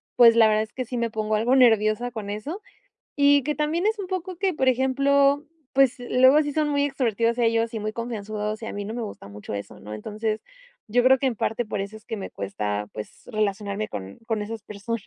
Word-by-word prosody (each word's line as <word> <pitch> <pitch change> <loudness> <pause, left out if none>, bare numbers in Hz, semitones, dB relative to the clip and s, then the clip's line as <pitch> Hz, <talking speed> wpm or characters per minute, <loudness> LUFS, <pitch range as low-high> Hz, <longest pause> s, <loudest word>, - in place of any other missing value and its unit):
pues 230 -1 +7
la 225 -1 +7
verdad 215 0 +3
es 220 - -11
que 255 -1 -3
sí 250 - -6
me 235 -1 0
pongo 215 0 -2
algo 240 +5 +2
nerviosa 225 -1 +4
con 215 -3 -6
eso 290 - -5 0.6
y 285 -1 +5
que 300 0 0
también 315 +6 0
es 435 0 +1
un 375 -2 -5
poco 370 -1 -4
que, 380 0 0
por 265 -3 +1
ejemplo, 275 +2 +3 0.3
pues 270 -2 +4
luego 260 +4 +5
sí 290 -1 -3
son 305 0 +1
muy 285 0 +2
extrovertidos 235 -4 0
ellos 230 -1 +2
y - - -1
muy 215 +1 -3
confianzudos 215 -2 -4
y - - -5
a - - -5
mí 205 0 -4
no 215 - -5
me 240 - -3
gusta 200 - -8
mucho 105 0 -8
eso, 100 - -7
¿no? 105 +1 -8
Entonces, 215 - -3 0.5
yo 245 +3 +3
creo 260 +1 +6
que 270 - 0
en 250 - +1
parte 230 +4 -1
por 210 -2 -3
eso 200 +2 -5
es 220 - -15
que 225 - -5
me 190 - -6
cuesta 105 +1 -3
pues 105 -1 -9
relacionarme 210 -1 -2
con 95 - -7
con 220 -2 -1
esas 220 0 -6
personas. 210 +1 -5
230 Hz, 230 wpm, -25 LUFS, 210-265 Hz, 0.6 s, pues